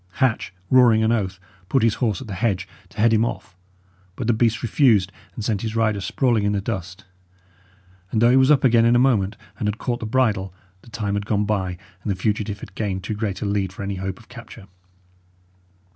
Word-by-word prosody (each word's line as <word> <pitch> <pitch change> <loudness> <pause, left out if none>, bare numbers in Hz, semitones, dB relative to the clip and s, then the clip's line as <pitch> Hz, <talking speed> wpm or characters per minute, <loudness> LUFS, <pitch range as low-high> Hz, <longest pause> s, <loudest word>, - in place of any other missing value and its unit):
Hatch, 125 -9 0 0.2
roaring 120 -4 +6
an 110 - +2
oath, 95 -5 -1 0.3
put 135 -4 +2
his 115 -2 +4
horse 110 -2 0
at - - -7
the 105 - -7
hedge, 95 -2 -1 0.2
to 100 - -20
head 115 +1 +4
him 110 0 +3
off; 105 -5 -4 0.6
but 125 - -4
the 120 - +3
beast 115 0 +1
refused, 110 -6 +3 0.2
and 110 - -5
sent 105 -3 0
his 110 -1 -4
rider 110 -3 +1
sprawling 120 +1 +1
in 105 0 +1
the 100 - 0
dust. 95 -3 -5 1.0
And 110 - 0
though 120 +2 +5
he - - +4
was 130 +1 +5
up 150 -2 +4
again 120 -3 +5
in 120 +1 +4
a 125 +2 +5
moment, 105 -5 +1 0.2
and 105 - -1
had 105 +1 -1
caught 120 -1 -2
the 110 - -4
bridle, 105 -6 0 0.3
the 120 - -17
time 105 -3 -3
had 100 0 -2
gone 105 -1 +1
by, 95 -4 -1 0.2
and 100 - -2
the - - -1
fugitive 105 +1 -2
had 95 - -10
gained 95 -3 -3
too 110 - -3
great 105 -2 -3
a - - -2
lead 100 -2 -1
for 95 - -8
any 100 -1 -3
hope 95 0 -4
of 110 - -18
capture. 115 -3 -12
110 Hz, 220 wpm, -22 LUFS, 100-115 Hz, 1.0 s, roaring